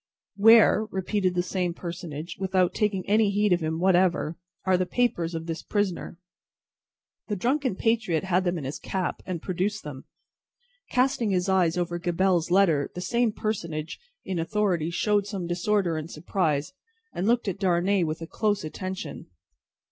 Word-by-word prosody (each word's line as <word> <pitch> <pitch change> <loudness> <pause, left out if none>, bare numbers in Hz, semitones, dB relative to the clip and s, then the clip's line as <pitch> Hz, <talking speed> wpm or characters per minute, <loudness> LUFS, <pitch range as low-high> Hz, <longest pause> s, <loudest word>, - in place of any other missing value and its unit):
"Where," 220 +1 +6
repeated 190 -1 -1
the 175 - +1
same 180 -2 -2
personage, 170 -2 -6
without 190 -2 +1
taking 200 -3 -1
any 215 0 +4
heed 205 -1 +2
of 175 - +2
him 160 -1 -2
whatever, 180 -3 +2 0.3
"are 190 -1 +4
the 180 0 0
papers 175 -9 0
of 165 0 -4
this 165 -1 -4
prisoner?" 200 -4 -2 1.1
The 210 - -1
drunken 255 +3 0
patriot 215 -7 +1
had 185 -1 +1
them 175 -1 0
in 155 - -5
his 135 +2 -5
cap, 185 -2 -3
and 175 -3 -4
produced 200 +4 -2
them. 145 -3 -8 0.8
Casting 250 -3 +1
his 185 -1 +1
eyes 180 -3 +2
over 175 -1 -1
Gabelle's 175 -1 +1
letter, 175 -6 +3
the - - -4
same 235 +4 +1
personage 170 -8 -4 0.3
in 185 -3 -2
authority 175 -2 0
showed 205 +3 +1
some 195 -4 -4
disorder 175 0 0
and 155 +1 -5
surprise, 155 - -1 0.4
and 190 - -2
looked 235 -1 +2
at 195 0 -2
Darnay 185 0 +2
with 160 0 -3
a - - -4
close 210 0 0
attention. 185 -1 -6
185 Hz, 160 wpm, -26 LUFS, 170-205 Hz, 1.1 s, Where